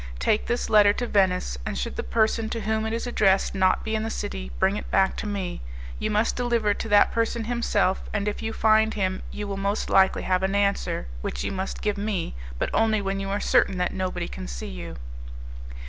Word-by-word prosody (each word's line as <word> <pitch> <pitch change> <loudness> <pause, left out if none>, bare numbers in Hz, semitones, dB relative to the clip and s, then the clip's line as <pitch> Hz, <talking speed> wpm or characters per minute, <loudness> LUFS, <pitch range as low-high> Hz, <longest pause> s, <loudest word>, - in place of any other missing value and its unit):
Take 210 - +1
this 240 - -1
letter 210 -2 +6
to 245 - -2
Venice, 180 - +1
and 65 - -4
should 60 - -3
the - - -2
person 220 0 +1
to 230 0 -3
whom 220 +1 -1
it - - -2
is 230 - -2
addressed 195 -5 +2
not 190 -1 +2
be 220 - -3
in 220 - 0
the 225 - -2
city, 65 - -4
bring 195 - +2
it - - -6
back 190 0 +3
to - - -4
me. 195 - -3 0.4
You - - -1
must 215 +2 +1
deliver 235 -4 +1
it - - -2
to 225 - -4
that 205 0 +5
person 230 0 0
himself, 220 -5 0
and 205 -1 -1
if 210 - -2
you 225 0 -2
find 220 0 +3
him 190 -2 -1
you 210 0 -5
will 195 -1 -4
most 200 +2 -1
likely 190 0 +4
have 185 0 +1
an 190 +1 0
answer, 200 - 0 0.2
which - - -3
you - - -2
must 190 0 -4
give 210 -1 0
me, 200 -4 -2 0.2
but - - -2
only 220 -1 +3
when 195 -1 -2
you 195 0 -4
are 200 +1 -1
certain 190 - +2
that 180 0 0
nobody 185 -1 -2
can 60 0 -7
see - - -6
you." 60 -1 -7
205 Hz, 225 wpm, -25 LUFS, 190-220 Hz, 0.4 s, letter